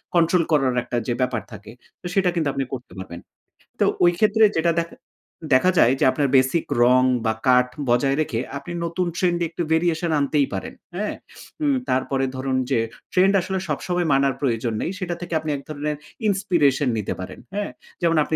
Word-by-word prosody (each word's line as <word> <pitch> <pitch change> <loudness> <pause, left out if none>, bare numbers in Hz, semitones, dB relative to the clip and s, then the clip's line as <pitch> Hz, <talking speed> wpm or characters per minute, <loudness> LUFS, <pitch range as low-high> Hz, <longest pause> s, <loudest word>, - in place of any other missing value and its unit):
Control 170 +1 +4
করার 135 -5 +2
একটা 120 - -3
যে 120 - +1
ব্যাপার 125 -3 0
থাকে, 105 0 -10 0.3
তো - - -16
সেটা 195 -3 +3
কিন্তু 160 -3 0
আপনি 135 - -1
করতে 125 -2 -7
পারবেন। 90 -2 -7 0.6
তো - - +4 0.2
ওই 175 - +6
ক্ষেত্রে 220 +1 +4
যেটা 165 +1 +2
দেখা 170 0 -4 0.6
দেখা 180 +9 +5
যায় 125 - +5
যে, - - +3
আপনার 145 -2 0
বেসিক 130 +5 +2 0.2
রং 125 +1 +5 0.2
বা 110 - +2
কাট 125 0 +5 0.2
বজায় 135 +3 +3
রেখে, 115 -7 -2 0.2
আপনি 140 +5 -8
নতুন 175 +2 -1
ট্রেন্ড 175 -3 +1
এ - - +2
একটু 175 - -5
variation 165 0 +1
আনতেই 140 0 +1
পারেন। 95 - -5 0.2
হ্যাঁ? 210 +3 -2 0.5
উম 285 -2 +3
তারপরে 135 +1 0
ধরুন, 130 0 -1
যে - - +3 0.3
ট্রেন্ড 190 +2 +4
আসলে 190 +1 -2
সবসময় 175 +4 -1
মানার 135 0 +3
প্রয়োজন 115 -4 0
নেই। - - -2
সেটা 175 -2 -3
থেকে 175 -1 -6
আপনি 155 - -5
এক 140 - -9
ধরনের 150 0 -3 0.3
inspiration 165 -9 +2
নিতে 105 - -2
পারেন। 95 - -7 0.2
হ্যাঁ? 205 -9 -2 0.3
যেমন 165 -1 +2
আপনি 155 - -2
150 Hz, 185 wpm, -23 LUFS, 130-175 Hz, 0.6 s, ওই